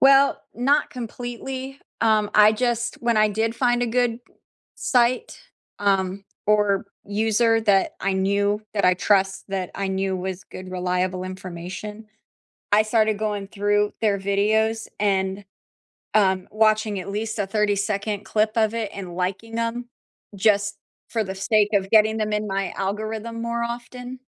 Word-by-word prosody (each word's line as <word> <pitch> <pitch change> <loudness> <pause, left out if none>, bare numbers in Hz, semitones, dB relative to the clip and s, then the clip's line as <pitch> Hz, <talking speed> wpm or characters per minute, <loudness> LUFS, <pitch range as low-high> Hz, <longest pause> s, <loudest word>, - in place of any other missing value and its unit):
Well, 275 +1 +6
not 275 +5 +2
completely, 255 +3 -6 0.2
um, 215 -2 +3
I 210 0 +7
just 235 0 -1
when 235 -1 0
I 215 0 +5
did 220 +2 -1
find 245 0 +2
a - - +1
good 240 0 +1 0.6
site, 255 - +1 0.4
um, 195 -1 +1 0.2
or 210 -1 +2 0.2
user 225 +2 +2
that 200 -3 +3
I 195 - 0
knew 200 +2 +1
that 200 - +1
I 180 0 +5
trust, 195 0 +1
that 190 -2 -3
I 195 -1 -2
knew 190 0 -1
was 185 0 -5
good 185 +2 -10
reliable 180 0 -1
information, 185 +3 -7 0.7
I 205 +1 +6
started 215 -1 +2
going 210 -2 -2
through 205 +1 +1
their 205 -3 +2
videos 215 +3 +1
and, 195 -1 0 0.7
um, 190 -3 +3
watching 215 -1 +2
at 185 - -6
least 220 +2 -3
a 200 - +1
thirty-second 205 0 0
clip 215 0 +1
of 220 -1 +2
it 225 -3 -2
and 185 -3 -7
liking 195 +6 -3
'em 235 +1 -3 0.5
just 205 +1 +2 0.3
for 225 -2 0
the 190 -1 -5
sake 210 +2 +2
of 195 -1 +1
getting 220 0 +5
them 215 -1 -1
in 210 0 -1
my 195 -1 -1
algorithm 220 +3 -3
more 235 0 -2
often. 245 +2 -6
210 Hz, 150 wpm, -23 LUFS, 195-225 Hz, 0.7 s, I